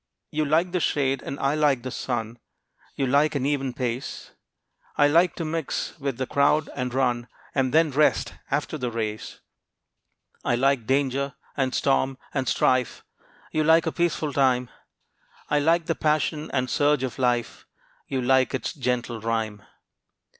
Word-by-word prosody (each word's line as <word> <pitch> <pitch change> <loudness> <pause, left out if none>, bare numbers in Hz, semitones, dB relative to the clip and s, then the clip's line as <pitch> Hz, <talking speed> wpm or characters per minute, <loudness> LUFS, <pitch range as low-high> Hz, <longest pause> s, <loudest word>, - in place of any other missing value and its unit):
You 155 0 0
like 165 +5 +2
the 180 - 0
shade, 135 -4 0
and 140 - -6
I 135 +1 +1
like 145 -5 +2
the 130 - -4
sun; 120 -2 -3 0.6
You 135 - 0
like 145 +4 +3
an 135 -2 0
even 135 -2 0
pace, 125 +1 -4 0.7
I 145 - +6
like 170 +4 +3
to 165 - -4
mix 160 -1 -3
with 135 -3 -3
the 130 - -1
crowd 145 +3 +2
and 125 0 -2
run, 120 -2 0 0.3
And 130 -2 +1
then 160 +1 +4
rest 150 +3 +2 0.2
after 150 +2 -2
the 125 -1 -2
race. 110 -2 -4 1.0
I 120 - +1
like 130 -2 +1
danger, 140 0 0 0.2
and 130 -2 0
storm 135 -1 +1 0.2
and 130 -3 0
strife, 130 -1 +1 0.5
You 155 - +1
like 160 +1 +5
a 160 - 0
peaceful 160 -4 -1
time; 125 -3 +2 0.8
I 150 - +4
like 165 +3 +2
the 165 - +1
passion 155 0 0
and 130 -2 0
surge 145 0 +2
of 130 -1 -4
life, 120 -2 -1 0.4
You 130 -2 -2
like 130 +1 +3
its 130 - -3
gentle 125 -4 -2
rhyme. 110 -2 -2
135 Hz, 160 wpm, -25 LUFS, 125-150 Hz, 1.0 s, I